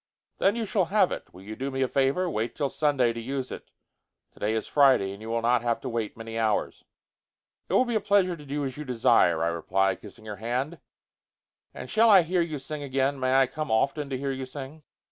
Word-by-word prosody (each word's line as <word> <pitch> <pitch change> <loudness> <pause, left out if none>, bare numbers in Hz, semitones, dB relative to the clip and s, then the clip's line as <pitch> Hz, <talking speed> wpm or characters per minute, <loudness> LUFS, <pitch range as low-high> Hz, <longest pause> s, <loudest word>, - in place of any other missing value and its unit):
"Then 200 +2 +3
you 230 -1 -2
shall 195 -2 +1
have 195 +1 +2
it. - - -6
Will 95 - -14
you 110 +2 -7
do 135 +4 -3
me 135 0 -1
a - - +1
favor? 135 +8 +1
Wait 115 -8 -2
till 140 - -1
Sunday 135 -6 +1
to 115 - -6
use 130 +2 -4
it. - - -8 0.6
Today 105 +2 -2
is 110 - -2
Friday, 135 -9 +4
and 100 - -12
you 110 - -7
will 115 0 -1
not 120 0 +3
have 120 -1 0
to 130 - -4
wait 115 -3 -3
many 115 0 -5
hours." 110 -2 -1 0.9
"It - - -3
will 255 - +4
be 240 - -3
a 220 - +2
pleasure 190 -3 +2
to 150 - -13
do 145 0 -3
as 130 0 -5
you 150 - -5
desire," 115 - +3
I 85 - +2
replied, 95 +3 0
kissing 110 +1 -13
her 105 -1 -6
hand. 125 +8 -3 0.9
"And - - -8
shall 225 +1 +4
I 195 -4 +8
hear 175 +2 +1
you 160 -3 -2
sing 145 +2 -6
again? 135 0 -1
May 130 0 +1
I 135 0 +6
come 155 +4 -5
often 140 +6 0
to 135 - -2
hear 135 +1 -2
you 130 -1 -5
sing?" 140 +3 -9
135 Hz, 235 wpm, -27 LUFS, 115-150 Hz, 0.9 s, I